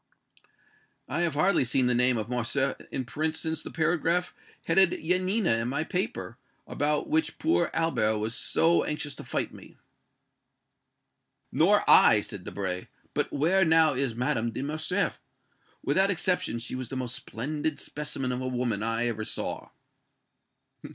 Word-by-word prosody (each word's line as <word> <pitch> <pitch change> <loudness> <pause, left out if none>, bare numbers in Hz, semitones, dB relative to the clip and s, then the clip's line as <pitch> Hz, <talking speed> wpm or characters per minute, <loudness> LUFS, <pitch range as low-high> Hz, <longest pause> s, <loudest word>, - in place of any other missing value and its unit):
"I 155 +6 -2
have 170 -4 0
hardly 180 +1 +3
seen 125 +1 +2
the 125 - +2
name 125 0 +3
of 110 - -3
Morcerf 130 +3 0 0.2
in 130 - -3
print 155 +6 -2
since 160 0 -2
the - - -7
paragraph 170 +2 0 0.3
headed 180 +1 +4
'Yanina' 185 - +1
in 115 - -2
my 140 +4 -1
paper, 180 - -4 0.3
about 150 0 -1
which 315 +2 0
poor 315 - +1
Albert 110 -10 +1
was 110 +2 -2
so 165 +6 +2
anxious 150 -1 -3
to - - -9
fight - - -3
me." - - -14 1.7
"Nor - - +3
I," - - +7
said - - -8
Debray. 95 -2 -4 0.3
"But - - -1
where 175 +7 +2
now 160 -2 +4
is 130 -3 -1
Madame 120 -2 0
de 130 +3 -5
Morcerf? 155 +7 -1 0.6
Without 195 +1 +2
exception, 180 - 0
she 115 - -5
was 130 -2 -5
the 135 - -4
most 125 -2 -2
splendid 145 +6 -4
specimen 145 -3 -2
of 125 0 -3
a 130 - -3
woman 120 -4 -1
I 115 +2 -1
ever 110 -2 -2
saw!" 105 - -3
145 Hz, 150 wpm, -27 LUFS, 120-165 Hz, 1.7 s, I